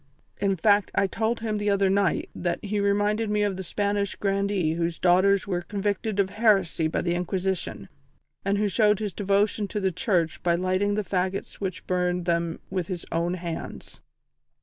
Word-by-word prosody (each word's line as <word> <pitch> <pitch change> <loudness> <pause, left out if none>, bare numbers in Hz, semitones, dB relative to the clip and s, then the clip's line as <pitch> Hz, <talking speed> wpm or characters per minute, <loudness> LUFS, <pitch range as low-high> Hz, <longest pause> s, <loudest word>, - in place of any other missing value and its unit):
In 195 -1 +1
fact, 205 +3 +3
I - - +3
told 220 +4 -1
him 215 -2 -1
the 205 0 0
other 200 -1 +3
night 195 -1 +1
that 175 -1 -1
he 205 +1 -1
reminded 205 +2 +1
me 210 0 +1
of 205 -2 0
the 190 - -5
Spanish 200 +2 -1
grandee 195 -4 0
whose 170 0 -1
daughters 185 +2 +4
were 180 -3 -1
convicted 205 +2 -2
of 190 -1 +2
heresy 200 -7 +2
by 155 - -1
the 170 0 0
Inquisition, 180 +1 -2 0.6
and 200 +1 +1
who 210 0 +1
showed 210 +1 +3
his 210 -2 -3
devotion 205 +1 +1
to 210 - -3
the 190 -1 +1
Church 175 -7 0
by 170 -1 +2
lighting 185 +3 +1
the 210 - 0
faggots 190 +1 -2
which 190 -2 -4
burned 180 -1 0
them 170 -1 0
with 185 -3 -2
his 180 -3 -5
own 170 +2 0
hands." 170 -2 -7
195 Hz, 180 wpm, -26 LUFS, 180-205 Hz, 0.6 s, daughters